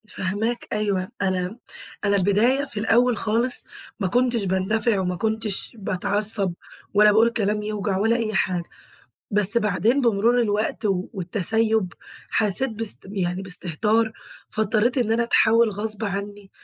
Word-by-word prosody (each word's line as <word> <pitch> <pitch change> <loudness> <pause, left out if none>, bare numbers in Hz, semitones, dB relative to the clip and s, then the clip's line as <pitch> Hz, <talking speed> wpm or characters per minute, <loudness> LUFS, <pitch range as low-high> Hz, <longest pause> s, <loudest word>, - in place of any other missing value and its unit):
فاهماك 210 +6 -2
أيوه، 200 -3 -1
أنا 185 +2 -1 0.5
أنا 200 0 +3
البداية 215 +9 +2
في 245 -6 -6
الأول 230 +1 +3
خالص، 230 +3 +1 0.4
ما 190 - 0
كُنتش 240 -1 +1
باندفع 200 +3 +1
وما 180 -1 -1
كُنتش 220 +1 -2
باتعصّب 200 0 0 0.4
ولا 210 +1 +6
باقول 225 +3 +4
كلام 210 -2 -1
يوجع 210 -2 -2
ولا 225 +4 +2
أي 225 -2 -2
حاجة. 180 -3 0 0.7
بس 210 +2 +3
بعدين، 215 +5 +1
بمرور 235 0 +2
الوقت 215 0 -1
و 190 -2 0
والتسيُّب 210 +2 0 0.4
حَسيت 220 +5 +3
باس 220 -1 -3
يعني 190 -2 -3
باستهتار، 210 +5 0 0.4
فاضطّريت 220 +4 +1
إن 225 -2 +1
أنا 235 - +2
أتحول 230 -1 +3
غصب 215 +1 -3
عني، 200 0 -5
210 Hz, 135 wpm, -23 LUFS, 195-225 Hz, 0.7 s, ولا